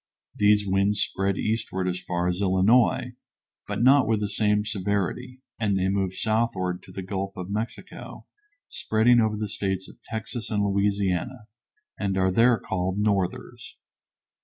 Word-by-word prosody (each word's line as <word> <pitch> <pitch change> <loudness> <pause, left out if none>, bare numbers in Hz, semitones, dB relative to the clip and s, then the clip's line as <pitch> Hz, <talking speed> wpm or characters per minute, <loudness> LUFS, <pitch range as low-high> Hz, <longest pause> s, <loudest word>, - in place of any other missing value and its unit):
These 105 0 +3
winds 100 +2 +1
spread 95 -1 0
eastward 105 -4 -2
as 90 0 -2
far 90 0 -2
as 90 +2 -1
Illinois, 100 +6 +3 0.5
but - - -2
not 135 -1 +6
with 110 -1 +2
the 105 -1 -2
same 105 0 +1
severity, 105 +5 -2 0.2
and 100 -4 +1
they 95 0 +1
move 95 -1 -1
southward 100 -5 -1
to - - -14
the 95 - -6
Gulf 95 +1 -4
of 90 +1 -6
Mexico, 110 +3 -6 0.4
spreading 115 +2 +3
over 110 -1 0
the 105 0 -2
States 95 -2 -3
of - - -16
Texas 110 +1 -6
and 105 -2 0
Louisiana, 100 +3 0 0.5
and 95 -2 -1
are 95 0 +2
there 115 +4 +4
called 95 -1 -3
"northers." 100 -3 -2
100 Hz, 150 wpm, -25 LUFS, 95-110 Hz, 0.5 s, not